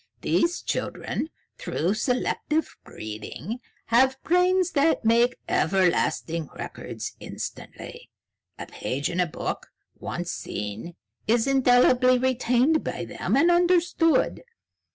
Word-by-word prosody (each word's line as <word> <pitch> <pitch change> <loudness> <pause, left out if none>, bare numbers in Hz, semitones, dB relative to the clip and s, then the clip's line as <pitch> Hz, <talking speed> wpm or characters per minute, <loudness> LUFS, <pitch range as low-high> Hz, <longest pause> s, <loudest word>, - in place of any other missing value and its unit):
"These 340 +1 +1
children, 315 - -3 0.3
through 180 +5 -1
selective 255 +6 -1
breeding, 110 - -7 0.3
have 260 +3 +3
brains 360 +1 +3
that 290 -4 +2
make 235 +2 +3
everlasting 170 -4 +1
records - - -6
instantly. - - -8 0.5
A - - -6
page 140 +5 -3
in 175 - -3
a 180 - +3
book, 150 - -5 0.3
once - - -5
seen, 105 +11 -6 0.3
is 225 +1 +3
indelibly 255 -1 +4
retained 255 +4 +2
by - - -4
them, - - -1
and 335 +5 +5
understood. 345 -2 +2
250 Hz, 105 wpm, -25 LUFS, 190-315 Hz, 0.5 s, and